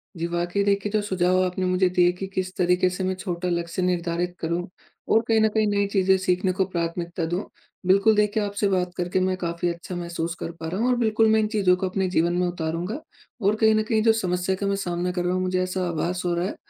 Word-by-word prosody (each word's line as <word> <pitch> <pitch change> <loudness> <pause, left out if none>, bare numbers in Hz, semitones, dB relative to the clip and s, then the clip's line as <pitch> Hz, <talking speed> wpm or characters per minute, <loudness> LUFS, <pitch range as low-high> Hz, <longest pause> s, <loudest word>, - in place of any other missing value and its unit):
जी, 170 0 -2
वाक़ई 175 +3 -1
देखिए, 200 0 0
जो 215 0 +1
सुझाव 185 -2 +1
आपने 185 +1 -2
मुझे 185 0 +2
दिए 175 -1 +5
कि 195 - -3
किस 185 0 -3
तरीके 180 0 +3
से 180 +1 -4
मैं 185 0 0
छोटा 180 -1 -3
लक्ष्य 170 +1 -2
निर्धारित 175 0 -1
करूँ 170 +2 -2 0.4
और 225 - +5
कहीं 225 -1 +3
न 220 - +5
कहीं 215 0 +1
नई 200 -1 +1
चीज़ें 190 -1 +3
सीखने 185 0 +1
को 190 +1 +1
प्राथमिकता 170 -1 -3
दूँ। 175 +5 -2 0.4
बिल्कुल 200 +3 +5
देखिए 210 0 +2
आपसे 205 0 -1
बात 180 -2 0
करके 180 +1 0
मैं 185 0 +1
काफ़ी 170 0 -2
अच्छा 170 +2 -8
महसूस 170 -1 -3
कर - - -4
पा 160 - -5
रहा 185 +4 -3
हूँ 240 - +2
और 250 - +3
बिल्कुल 225 -1 +3
मैं 220 - +4
इन 215 - +1
चीज़ों 200 -4 +3
को 185 0 -2
अपने 190 0 -1
जीवन 170 -1 +1
में 180 0 +1
उतारूँगा 175 - -3 0.4
और 205 +1 +3
कहीं 220 0 +4
न 215 - +2
कहीं 220 -2 +2
जो 225 -1 +5
समस्या 185 -3 -1
का 200 +1 -3
मैं 200 - +1
सामना 180 -2 -2
कर 180 -1 -2
रहा 180 - +1
हूँ 185 - 0
मुझे 185 0 0
ऐसा 185 0 -2
आभास 175 +2 -2
हो 175 - +1
रहा 170 +1 0
है - - -5
185 Hz, 245 wpm, -24 LUFS, 175-200 Hz, 0.4 s, दिए